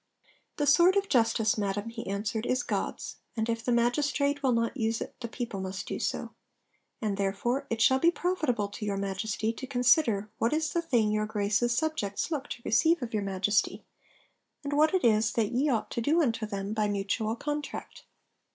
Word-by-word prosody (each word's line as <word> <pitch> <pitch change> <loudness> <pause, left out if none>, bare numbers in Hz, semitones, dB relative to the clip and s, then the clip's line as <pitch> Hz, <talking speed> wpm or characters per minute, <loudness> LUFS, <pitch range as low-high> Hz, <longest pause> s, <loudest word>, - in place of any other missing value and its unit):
'The 295 - +1
sword 345 +6 +6
of 400 0 +1
justice, 225 - +2
Madam,' 205 +2 -2
he 230 0 -7
answered, 210 +3 -2
'is 255 - +1
God's; - - -3 0.2
and 220 0 0
if 230 -1 -2
the 245 - 0
magistrate 280 +4 +1
will 265 -2 +2
not 230 +1 0
use 225 -3 0
it - - -6
the 235 - -4
people 230 -4 -5
must 190 +1 -5
do - - -4
so. - - -3 0.7
And 205 -2 -1
therefore 240 +8 -1
it 230 0 -2
shall 260 0 +5
be 335 - +5
profitable 310 - 0
to 205 - -8
your 200 -1 -1
Majesty 210 +3 -2
to 260 +3 -7
consider 245 -5 +3
what 230 +5 +1
is 310 0 0
the 340 - +1
thing 240 -10 +1
your 215 0 0
Grace's 215 +3 +1
subjects 310 -6 -1
look 290 -3 -2
to 235 - -7
receive 325 +9 +3
of 230 - -6
your 210 - 0
Majesty, 195 +1 0 0.8
and 285 0 -3
what 310 +5 +4
it 370 - +1
is 215 -1 +3
that 220 -3 0
ye 265 +5 +1
ought 230 -5 -1
to 235 - -2
do 300 +8 +2
unto 230 -8 0
them 200 0 -4
by 215 -1 +1
mutual 205 +2 -1
contract. 295 +4 -5
230 Hz, 195 wpm, -29 LUFS, 210-280 Hz, 0.8 s, sword